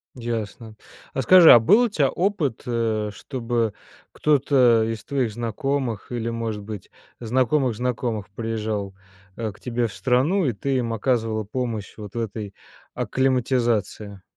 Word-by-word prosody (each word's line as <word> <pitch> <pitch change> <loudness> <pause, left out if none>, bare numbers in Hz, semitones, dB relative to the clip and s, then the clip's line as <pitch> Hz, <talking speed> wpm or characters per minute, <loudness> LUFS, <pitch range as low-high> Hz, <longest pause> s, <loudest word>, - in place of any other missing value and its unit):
Ясно, 115 -2 -5 0.4
а 135 - 0
скажи, 180 +2 +8
а - - +10
был 200 - +5
у - - +1
тя 145 - +1
опыт, 170 - -1
э, 115 -3 -1
чтобы 115 -3 -2 0.4
кто-то 130 -6 +3
из 115 -1 -4
твоих 130 -6 -1
знакомых 120 +1 -3
или, 115 -1 -2
может 115 -2 -3
быть, 105 -2 -8 0.3
знакомых 125 +2 +1
знакомых 115 -3 -2
приезжал, 105 -2 -3 0.4
э, 115 -2 -3
к - - -19
тебе 120 -1 -1
в 110 - -8
страну 135 +10 +2
и 130 - +1
ты 135 +6 -2
им 120 -2 -1
оказывала 115 -1 0
помощь 115 -1 -4
вот 105 -2 -9
в 120 - -2
этой 105 -2 -5 0.4
акклиматизации? 120 -6 0
115 Hz, 140 wpm, -23 LUFS, 110-130 Hz, 0.4 s, а